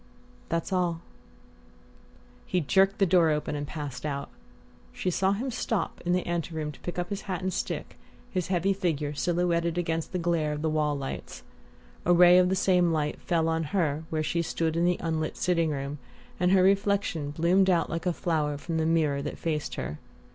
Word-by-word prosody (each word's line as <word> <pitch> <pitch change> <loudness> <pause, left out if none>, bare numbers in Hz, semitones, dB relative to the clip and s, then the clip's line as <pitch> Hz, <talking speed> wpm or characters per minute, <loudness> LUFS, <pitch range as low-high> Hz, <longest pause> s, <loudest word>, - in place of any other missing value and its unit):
"That's 165 +3 -1
all." 175 -2 0 1.5
He 180 - +1
jerked 195 +5 +3
the 195 - +4
door 175 -2 +4
open 150 -1 -1
and 145 0 -4
passed 140 -5 -6
out. 140 -2 -3 0.6
She 185 - -2
saw 190 +3 +2
him 250 +6 -3
stop 230 -3 -2
in 175 - 0
the 180 0 +1
ante 170 -1 -2
room 155 -1 -2
to 145 - -15
pick 175 - -6
up 175 0 -2
his 200 0 -3
hat 185 -1 -2
and 185 0 -1
stick, - - -4 0.3
his 185 -3 -1
heavy 190 +1 +1
figure 155 -6 -1
silhouetted 170 +2 0
against 165 -2 -1
the 185 - -1
glare 165 -3 0
of 150 +1 -5
the 160 - +1
wall 150 -2 +1
lights. 135 -1 -6 0.6
A 175 - +4
ray 180 +1 +7
of 180 0 +4
the 190 - +1
same 180 -2 +3
light 150 -2 -1
fell 165 -2 +1
on 165 0 0
her 155 -3 0
where 155 -1 -1
she 170 +2 0
stood 165 -1 -1
in 170 +1 +2
the 180 0 +2
unlit 160 -1 -2
sitting 170 -3 +1
room, 140 0 -4 0.4
and 180 0 +3
her 190 -1 +5
reflection 195 -5 +1
bloomed 175 +5 +3
out 170 -3 +3
like 165 +2 -3
a - - +3
flower 155 -4 -1
from 165 +3 -3
the 160 0 +1
mirror 155 -4 +2
that 145 - -5
faced 155 -3 -2
her. 75 - -5
170 Hz, 200 wpm, -28 LUFS, 155-180 Hz, 1.5 s, ray